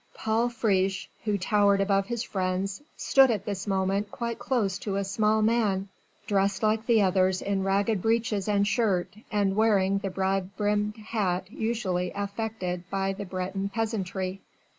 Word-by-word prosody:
Paul 225 +2 +1
Friche, 195 -5 0 0.2
who 210 -2 +1
towered 200 +1 +3
above 195 0 +2
his 235 0 -2
friends, 190 0 -2 0.2
stood 270 -1 +5
at 210 -4 -1
this 200 -1 -4
moment 195 +1 0
quite 235 -1 -4
close 205 -7 0
to 200 -2 -3
a 200 - 0
small 215 +2 +1
man, 210 -4 +1 0.4
dressed 200 0 +1
like 220 +1 +1
the 225 -3 +5
others 185 0 +2
in 200 -1 -1
ragged 195 +1 +1
breeches 225 -2 0
and 205 -1 +2
shirt, 205 -6 +1 0.2
and 200 -2 +1
wearing 200 -3 +3
the 195 - -3
broad 190 +1 -1
brimmed 210 0 0
hat 195 -4 -2
usually 195 -7 -1
affected 200 -3 -4
by 195 0 -1
the 200 +1 -6
Breton 190 +1 -3
peasantry. 195 -3 -3
200 Hz, 155 wpm, -27 LUFS, 190-220 Hz, 0.4 s, stood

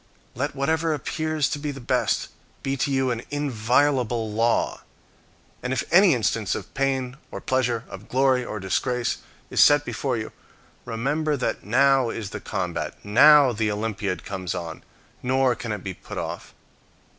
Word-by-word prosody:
Let 140 +4 -3
whatever 160 +3 +1
appears 155 +2 -1
to 145 - -3
be 150 0 -3
the 140 -1 -5
best 120 - 0 0.3
be 135 0 -1
to 140 +1 -1
you 135 -1 +1
an 115 -1 -2
inviolable 125 -3 +1
law. 115 +2 +1 0.8
And 125 - -3
if 130 - 0
any 180 -3 +7
instance 110 -3 0
of - - -7
pain 135 -1 -1
or - - -6
pleasure, 125 -3 0
or - - -8
glory 130 -1 +2
or 110 - -5
disgrace, 120 +6 -1 0.3
is - - +3
set 145 0 +6
before 130 -4 -2
you, 110 - -5 0.5
remember 145 +6 -1
that 125 - -2
now 130 +3 +3
is 110 -3 -5
the - - -6
combat, - - -3
now 140 +6 +7
the 110 -1 0
Olympiad 105 -3 -3
comes 95 -3 -4
on, 85 -2 -6 0.4
nor 130 0 +2
can 115 -1 -5
it 105 -3 -4
be 95 - -4
put - - -10
off. - - -5
125 Hz, 160 wpm, -24 LUFS, 110-140 Hz, 0.8 s, any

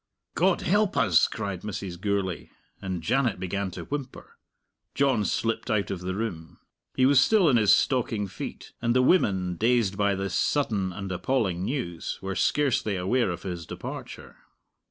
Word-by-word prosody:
"God 185 +1 +2
help 205 +2 +1
us!" 95 -8 +4
cried 100 -5 -5
Mrs. 95 -4 -6
Gourlay, 100 -3 -2 0.3
and 95 -4 -4
Janet 120 -1 +1
began 95 +1 -2
to 90 - -7
whimper. 140 -3 -7 0.6
John 135 -6 +2
slipped 115 +3 -1
out 105 -2 0
of 95 - -3
the 95 +1 -3
room. 90 -7 -5 0.4
He 130 - +3
was 140 0 +6
still 195 +5 +4
in 130 -5 +5
his 105 -3 +4
stocking 115 -6 +2
feet, 95 - -8
and 120 +1 +1
the 130 - +4
women, 95 - +2
dazed 115 -3 +2
by 100 -1 +2
this 95 -1 -3
sudden 105 -10 0
and 95 +1 -6
appalling 95 -2 -1
news, 90 - -3
were 95 0 -4
scarcely 130 -7 +1
aware 95 +6 +1
of 85 - -5
his 85 -4 -5
departure. - - -8
100 Hz, 160 wpm, -26 LUFS, 95-125 Hz, 0.6 s, was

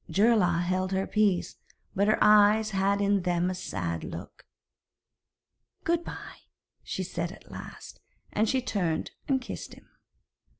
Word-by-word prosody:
Geirlaug 195 -5 +3
held 185 +1 -1
her 190 0 0
peace, 210 -4 +1 0.4
but 200 +2 +2
her 215 - +4
eyes 210 +1 +5
had 200 +1 +1
in 200 -1 +2
them 175 0 +1
a - - -2
sad 85 - -4
look. - - -9 1.4
'Good 340 0 +1
bye,' - - -10 0.3
she 190 - -4
said 170 -1 -3
at - - -14
last, - - -10 0.3
and 215 +1 +2
she 260 -2 +1
turned 180 -9 -1 0.2
and 270 -2 +2
kissed 250 - -7
him. - - -19
195 Hz, 140 wpm, -28 LUFS, 180-215 Hz, 1.4 s, eyes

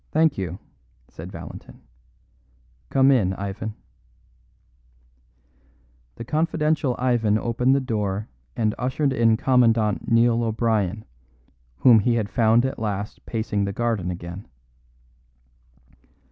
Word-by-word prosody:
"Thank 160 -1 +2
you," 90 -2 -4 0.5
said - - -10
Valentin. - - -10 1.1
"Come 135 0 +4
in, 100 -8 +2
Ivan." 100 +3 -5 2.4
The - - -7
confidential 155 -3 0
Ivan 120 -4 +1
opened 125 +4 +1
the 140 - +1
door 105 -4 -2 0.3
and 110 -2 0
ushered 130 +3 0
in 115 -3 +3
Commandant 115 -5 +2
Neil 115 0 +4
O'Brien, 110 -3 -1 0.7
whom 115 - +6
he 115 +3 +1
had 110 -3 -1
found 115 +2 +3
at 130 - -3
last 105 -1 -4
pacing 110 -3 -1
the 100 - -3
garden 115 -5 -1
again. 85 +2 -7
115 Hz, 105 wpm, -23 LUFS, 105-125 Hz, 2.4 s, whom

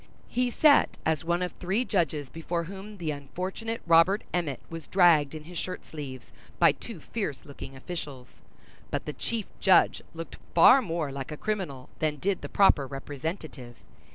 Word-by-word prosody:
He 250 +1 +1
sat 285 +4 +4
as 160 -2 +1
one 175 +2 0
of 180 - -2
three 195 +7 -1
judges 155 - 0
before 170 +1 -3
whom 195 +4 -9
the 165 -4 -2
unfortunate 185 - -5
Robert 170 +5 +5
Emmet 165 -7 -1
was 165 -2 -8
dragged 165 -6 +4
in 155 - -7
his 170 +2 -6
shirt 185 0 -5
sleeves, 135 -5 -8 0.2
by 170 -3 +6
two 200 +6 -9
fierce 175 - -4
looking 135 -1 -9
officials; 135 -3 -7 0.5
but - - -3
the 150 - -4
chief 225 +4 -3
judge 190 - +5
looked 165 0 -7 0.2
far 250 +10 +8
more 165 - -2
like 135 0 -6
a 150 - -5
criminal 180 -12 -3
than 155 -1 +1
did 190 +6 -1
the - - -6
proper 155 -8 +4
representative. 140 -2 -6
165 Hz, 165 wpm, -28 LUFS, 145-190 Hz, 0.5 s, far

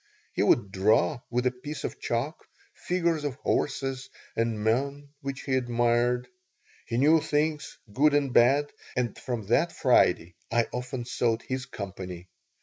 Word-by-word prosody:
He - - 0
would 100 - +3
draw, 110 +7 +2
with 125 +1 0
a 125 - +3
piece 135 +3 -7
of - - -4
chalk, 130 +8 -2 0.3
figures 170 -4 0
of 145 -4 -2
horses 135 -1 -1 0.3
and 115 -2 -1
men 140 +6 0
which 135 -1 -5
we 130 - +1
admired. 120 0 +1 0.6
He 115 - -2
knew 155 +5 +5
things, 150 +1 -1 0.2
good 145 +4 +4
and 140 -3 +1
bad, 140 +5 +4 0.2
and 125 -2 -1
from 120 -5 -4
that 170 +8 +3
Friday 90 - +3 0.2
I 115 0 +3
often 125 0 -4
sought 115 -2 0
his 130 +1 -4
company. 95 -5 -7
125 Hz, 145 wpm, -27 LUFS, 115-145 Hz, 0.6 s, knew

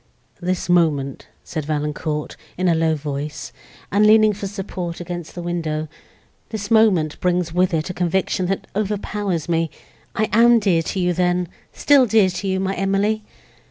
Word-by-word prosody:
"This 180 0 -2
moment," 155 -6 +1 0.2
said 155 -3 -5
Valancourt, 150 0 -3 0.2
in 185 +1 +1
a 170 - +4
low 160 -1 +2
voice, 145 0 -5 0.4
and 205 +2 +3
leaning 215 0 +6
for 200 0 -5
support 190 -3 -5
against 175 -1 -6
the 175 - -5
window—"this 170 +5 -6
moment 195 -9 +3
brings 180 -2 0
with 180 +1 +2
it 160 +1 -1
a - - -7
conviction 180 +1 0
that 195 +1 -2
overpowers 205 -4 -2
me!—I 165 +5 -3
am 235 +2 +6
dear 190 -7 +2
to 190 - -3
you 180 -1 +1
then—still 180 - +1
dear 215 -3 +4
to 195 - -4
you, 190 0 0
my 190 0 -1
Emily!" 195 +3 0
180 Hz, 150 wpm, -21 LUFS, 165-200 Hz, 0.4 s, leaning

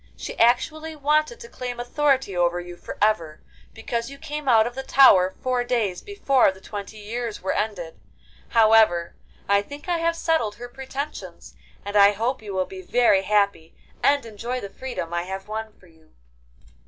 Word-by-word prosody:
she - - -6
actually 310 +7 +2
wanted 305 +8 +1
to 465 - -10
claim 250 - -6
authority 265 -4 0
over 175 0 +1
you 175 0 -8
for - - -9
ever, 170 -8 +1 0.3
because 235 - -4
you 275 - -10
came 300 0 -6
out 220 -2 +5
of 240 - -4
the 265 - -5
tower 190 -9 +5
four 255 -1 0
days 225 -7 -1
before 275 - +2
the 190 - -14
twenty 205 +2 -8
years 220 0 -5
were 190 - 0
ended. 195 -6 -3 0.5
However, 220 -6 +4 0.3
I 200 0 +3
think 285 - -11
I 345 -1 0
have 335 0 +1
settled 320 -11 0
her 245 +3 -9
pretensions, 270 +3 -7 0.3
and 205 0 -5
I 200 0 +7
hope 235 +5 -2
you 210 -2 -8
will 185 0 +1
be 190 0 -9
very 205 0 +3
happy 200 -5 0 0.3
and 285 -3 +3
enjoy 230 +3 -5
the 200 -4 -8
freedom 245 -10 -6
I 170 - 0
have 190 +2 -7
won 220 +1 -5
for - - -21
you. 160 -2 -24
225 Hz, 180 wpm, -24 LUFS, 195-265 Hz, 0.5 s, I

